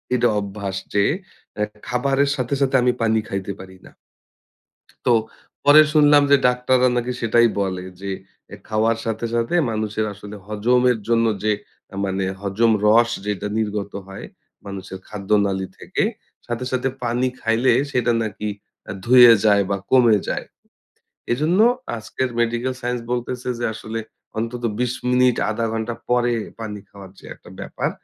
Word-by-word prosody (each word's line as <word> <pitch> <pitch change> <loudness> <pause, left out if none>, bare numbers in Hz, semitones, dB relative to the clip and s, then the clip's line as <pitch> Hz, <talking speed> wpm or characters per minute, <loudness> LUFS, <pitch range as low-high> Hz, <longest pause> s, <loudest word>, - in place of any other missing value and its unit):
এটা 120 0 +3
অভ্যাস 100 -1 -5 0.2
যে 100 -1 +3 0.5
অ্যা 105 0 0 0.2
খাবারের 135 +3 +1
সাথে, 130 +1 -2
সাথে 135 -1 +2
আমি 125 - +3
পানি 110 -1 +2
খাইতে 95 0 -3
পারি 95 0 -11
না। - - -14 1.1
তো 125 - +5 0.5
পরে 145 +2 +8
শুনলাম 145 -1 +6
যে 140 - +8
ডাক্তাররা 125 0 +2
নাকি 120 +1 -1
সেটাই 115 +1 +4
বলে 95 -2 -2 0.2
যে 100 0 -4 0.4
এ - - -5
খাওয়ার 110 +1 +1
সাথে, 115 0 -2
সাথে 115 +8 0 0.2
মানুষের 110 0 -2
আসলে 105 +1 -10
হজমের 125 +4 +2
জন্য 115 0 +3 0.2
যে 110 - +2 0.5
মানে 95 0 -1 0.2
হজম 105 +3 +2
রস 115 +2 +5
যেটা 105 0 -2
নির্গত 105 -2 -2
হয় 95 0 -8 0.4
মানুষের 95 -1 -7
খাদ্যনালী 100 -1 0
থেকে। - - -2 0.4
সাথে, 120 +1 -4
সাথে 130 +1 0
পানি 120 +2 0
খাইলে 115 +3 +2 0.2
সেটা 125 -2 +1
নাকি 105 0 -4 0.4
এ - - -3
ধুয়ে 120 -1 +9
যায় 100 -1 +5
বা 100 - 0
কমে 120 -5 +6
যায়। - - -2 0.9
এজন্য 155 +10 +1 0.4
আজকের 130 +3 -3
মেডিকেল 120 +2 0
সাইন্স 125 0 -2
বলতেছে 125 +1 -3
যে 120 - -1
আসলে 110 +1 -5 0.4
অন্তত 120 +2 -4 0.2
২০ 125 0 0 0.2
মিনিট 125 -1 +4
১/২ 115 +1 -1
ঘন্টা 115 +1 -2 0.2
পরে 120 0 +2 0.3
পানি 105 -2 -5
খাওয়ার 100 -2 -12
যে - - -15
একটা - - -17
ব্যাপার। - - -3
115 Hz, 150 wpm, -21 LUFS, 105-125 Hz, 1.1 s, ধুয়ে